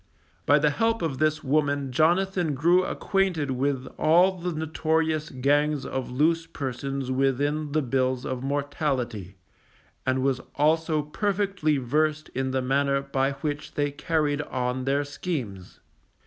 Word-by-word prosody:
By 145 - +6
the 150 0 +3
help 225 +5 0
of 140 -5 -2
this 155 0 +1
woman 145 -1 +1
Jonathan 175 +2 +2
grew 170 +6 +4
acquainted 185 -7 0
with 135 0 -1
all 175 +4 +4
the 180 +1 -2
notorious 160 0 0
gangs 145 +2 +1
of 130 -1 -3
loose 165 +6 +1
persons 135 -2 -4
within 140 +3 0
the 155 -1 +2
bills 130 0 0
of 130 -1 -3
mortality, 135 - -2 0.7
and 130 0 0
was 135 -2 +1
also 155 +1 +2
perfectly 195 -2 0
versed 150 +4 0
in 130 0 -2
the 130 0 -1
manner 140 +1 +2
by 140 0 0
which 145 +2 -5
they 145 -1 0
carried 150 -1 0
on 125 -2 -2
their 140 +2 +1
schemes. 135 - -5
145 Hz, 135 wpm, -26 LUFS, 130-155 Hz, 0.7 s, By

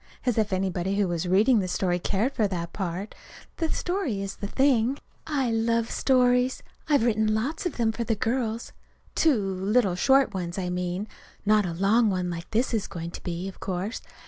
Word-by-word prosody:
As 245 -3 +2
if 215 -1 +1
anybody 190 0 -1
who 200 -1 +2
was 175 0 -2
reading 210 +6 +4
the 185 - -1
story 180 0 0
cared 215 +9 0
for 215 -4 +2
that 170 -3 -4
part! 190 +1 -4 0.4
The 325 -1 -1
story's 240 - -2
the 200 - -4
thing. 265 +1 +2 0.3
I 275 -6 0
love 230 0 +1
stories. 250 -1 +2 0.3
I've 285 -6 +4
written 215 -2 +2
lots 285 - -1
of 350 - -6
them 230 -2 +2
for 235 +1 -3
the 225 0 0
girls, 230 +1 -2 0.4
too 315 -4 +4
little 195 +2 +1
short 265 +5 +3
ones, 175 -1 -4
I 180 -2 -2
mean; 180 +3 -2 0.4
not 210 -2 +4
a 170 - -3
long 210 +6 +3
one 180 -2 -1
like 170 0 -6
this 235 +3 0
is 220 -3 0
going 170 0 -6
to - - -8
be, 175 +1 -4
of 195 - -9
course. 190 +3 -3
210 Hz, 190 wpm, -26 LUFS, 185-240 Hz, 0.4 s, reading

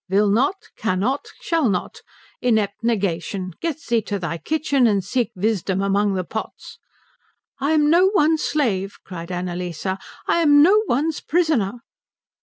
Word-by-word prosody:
"Will 200 +2 +3
not! 260 - +2 0.2
Cannot! 220 +7 -1
Shall 330 - +1
not! 180 -3 -3 0.4
Inept 220 -3 0
Negation, 190 -4 -1
get 330 -2 -3
thee 235 -4 0
to 205 -1 -3
thy 170 -2 -4
kitchen 285 - +1
and 200 -3 +1
seek 245 +3 -1
wisdom 195 -1 0
among 200 0 +1
the 185 - -1
pots." 220 +5 -7 0.8
"I 280 +3 +1
am 300 -1 +3
no 355 +3 +5
one's 315 -1 +3
slave," 205 -10 -1
cried 175 -2 -7
Annalise, 180 -1 -4
"I 190 0 -1 0.3
am 295 -4 +5
no 405 +6 +5
one's 300 +5 0
prisoner." 280 - 0
220 Hz, 145 wpm, -22 LUFS, 190-290 Hz, 0.8 s, no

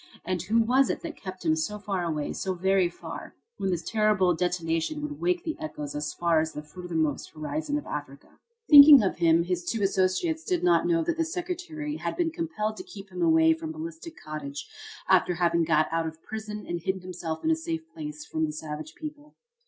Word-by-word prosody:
And 180 -1 -1
who 225 +6 +2
was 260 +4 +3
it - - -2
that 330 -2 -6
kept 185 -3 -8
him 160 -1 +4
so 160 +7 -2
far 195 -3 -2
away, 155 -3 -2
so 190 -1 -2
very 190 0 +2
far, 170 - -9 0.2
when 195 - -1
this 175 -3 -1
terrible 215 -5 +3
detonation 170 - -1
would 295 -1 -5
wake 355 0 +1
the 320 - -3
echoes 150 - -5
as 150 0 -3
far 170 -2 +2
as 160 0 -3
the 150 - -6
furthermost 160 -2 -2
horizon 295 - -2
of 295 - -5
Africa? 140 -1 -8 0.3
Thinking 285 -4 +10
of 190 - 0
him, 165 -1 +4
his 175 0 -2
two 220 +3 -2
associates 195 - +1
did 360 0 -1
not 355 -1 +4
know 335 -1 +2
that 340 0 -1
the 330 - +2
Secretary 330 -3 -4
had - - -3
been 340 -2 +1
compelled 305 -11 -3
to - - -6
keep 195 -1 -11
away 320 - +4
from 320 0 -6
Ballistic 325 +1 -7
Cottage 145 -2 -6 0.4
after 180 - +4
having 170 -1 +2
got 155 -1 +3
out 165 0 0
of 160 0 -9
prison 215 -1 -6
and 175 0 -2
hidden 190 +2 -2
himself 175 -3 -5
in 320 - +2
a - - +4
safe 325 0 -4
place 300 -1 -7
away - - -21
from 160 0 +1
the - - -4
savage 155 0 -6
people. 300 -1 -9
195 Hz, 205 wpm, -27 LUFS, -, 0.4 s, Thinking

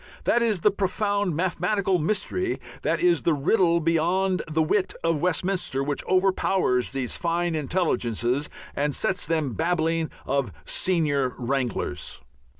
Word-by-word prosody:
That 240 - +3
is 215 -6 +1
the 210 - +4
profound 200 -1 0
mathematical 185 +2 +1
mystery, 215 - -1 0.2
that - - 0
is 355 -1 +3
the 165 - +2
riddle 170 +3 +3
beyond 175 +3 +1
the 160 +1 +2
wit 185 +4 0
of 165 -3 +1
Westminster, 180 -5 0
which 145 0 -2
overpowers 185 -8 +2
these 135 -3 -3
fine 170 0 0
intelligences 140 - 0 0.3
and 145 0 0
sets 185 -4 0
them 155 -6 0
babbling 165 0 0 0.2
of 140 -1 0
"senior 145 -8 0
wranglers." 125 -1 -2
170 Hz, 130 wpm, -25 LUFS, 145-190 Hz, 0.3 s, the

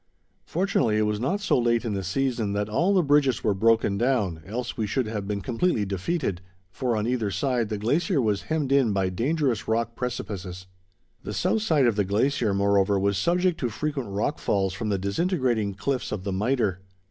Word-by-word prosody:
Fortunately, 160 - +1
it 110 - +2
was 105 0 -1
not 185 - -1
so 205 - +2
late 120 -1 +1
in 110 - -1
the 95 -1 -2
season 115 +1 -1
that 105 0 -1
all 170 - +2
the 190 -3 +4
bridges 140 -4 +2
were 105 - +2
broken 110 -1 +2
down, 110 -10 0
else 120 +4 -4
we 110 -2 -2
should 130 +4 0
have 105 -2 -4
been 100 -1 -2
completely 115 - 0
defeated, 95 - -2 0.3
for, 120 0 -1
on 105 - -1
either 120 -3 0
side, 120 0 0
the 105 - -2
glacier 150 - +1
was 105 -5 +1
hemmed 155 -4 0
in 135 -6 +3
by 95 -1 +1
dangerous 130 - 0
rock 115 +1 0
precipices. 100 -7 -5 0.6
The - - -6
south 220 - +1
side 155 -10 +3
of 115 -3 +2
the 105 - +3
glacier, 110 +3 +1
moreover, 100 0 +2
was 100 +1 +1
subject 175 - +1
to 125 - -1
frequent 135 0 -3
rock 100 +2 -1
falls 95 -2 0
from 110 +2 -3
the 100 - +1
disintegrating 110 - 0
cliffs 130 +6 -2
of 105 -3 -4
the 100 - -3
Mitre. 105 -2 0
115 Hz, 195 wpm, -25 LUFS, 100-135 Hz, 0.6 s, the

